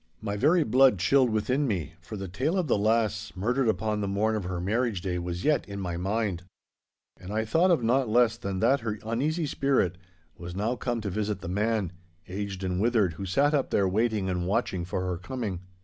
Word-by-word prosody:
My 100 -2 -3
very 155 - +4
blood 130 -2 +5
chilled 125 +8 +3
within 125 +6 0
me, 85 - -2
for 105 +6 -8
the 95 -1 -5
tale 135 - -1
of 185 - +1
the 135 - +2
lass 110 -1 +1
murdered 120 +7 0
upon 105 0 0
the 100 - -1
morn 105 +3 +1
of 105 -4 -3
her 90 -1 -3
marriage 105 +1 0
day 90 -2 -2
was 85 0 -4
yet 150 -1 +2
in 100 0 -5
my 90 -3 -3
mind. 95 0 -1 0.8
And 90 - -8
I 110 +1 0
thought 165 +11 +3
of 165 -9 +3
naught 125 +1 +2
less 115 0 +4
than 100 -5 -4
that 140 +1 +4
her 110 -2 -3
uneasy 150 +9 0
spirit 130 - +1 0.4
was 85 0 -8
now 110 +5 0
come 120 -2 -2
to 100 -2 -3
visit 105 0 -2
the 95 - -5
man, 105 -1 0 0.4
aged 95 0 -5
and 90 0 -1
withered, 110 -6 +2
who 95 +5 -6
sat 140 +10 +2
up 140 -3 +1
there 100 - +2
waiting 105 0 0
and 90 -1 -1
watching 95 -4 0
for 90 +1 -3
her 90 -1 -2
coming. 100 -2 -4
105 Hz, 210 wpm, -27 LUFS, 95-120 Hz, 0.8 s, blood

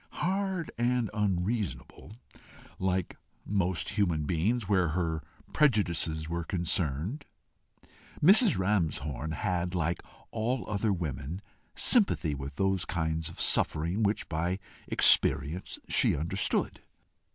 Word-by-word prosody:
Hard 190 -2 -2
and 120 -2 +1
unreasonable, 105 0 -2 0.7
like 95 -1 -1 0.3
most 90 -6 0
human 90 -7 0
beings, 95 +8 0
where 95 -4 +2
her 80 -3 -1 0.3
prejudices 85 - +1
were 85 +1 -3
concerned, 85 - -1 1.1
she 220 +1 +5
had, 85 - -1
like 85 0 0 0.3
all 115 +3 -2
other 105 0 0
women, 80 -2 -4 0.4
sympathy 195 - +3
with 70 0 -6
those 95 +1 +1
kinds 80 -1 -2
of 80 - -12
suffering 85 +7 +1
which 105 0 +1
by 85 +4 -1 0.3
experience 75 +6 +2
she - - +3
understood. 85 +5 0
90 Hz, 100 wpm, -29 LUFS, 80-105 Hz, 1.1 s, she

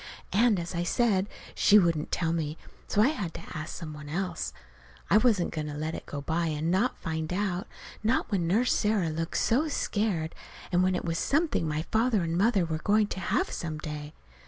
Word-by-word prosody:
As 200 -6 +2
I 170 - -1
said, 200 +2 +2 0.2
she 210 - +6
wouldn't 170 -6 +2
tell 165 -2 0
me, 155 -1 -2 0.3
so 210 - +3
I 255 - +5
had 195 - -4
to - - -7
ask 155 0 -5
some 160 -3 -6
one 150 -1 -9
else. 175 +1 -2 0.6
I 205 - +7
wasn't 215 -6 +3
going 155 -1 -3
to 145 - -5
let 155 +2 -3
it - - -7
go 145 - -5
by 165 +3 0
and 155 +1 -1
not 195 +8 +1
find 160 -1 -3
out 190 -1 -1 0.3
not 225 +2 +1
when 180 -5 +1
Nurse 225 +8 +3
Sarah 210 -6 +1
looked 165 +1 -2
so 275 +8 +2
scared, 205 - -1 0.4
and 180 0 +3
when 185 0 +2
it 180 - -3
was 165 -1 -1
something 300 - +1
my 155 +1 -1
father 220 -3 +2
and 165 0 -1
mother 200 -1 +3
were 160 -1 -2
going 210 +5 +3
to - - -4
have 365 - 0
some 160 -2 -4
day. 150 -1 -6
175 Hz, 205 wpm, -28 LUFS, 160-210 Hz, 0.6 s, I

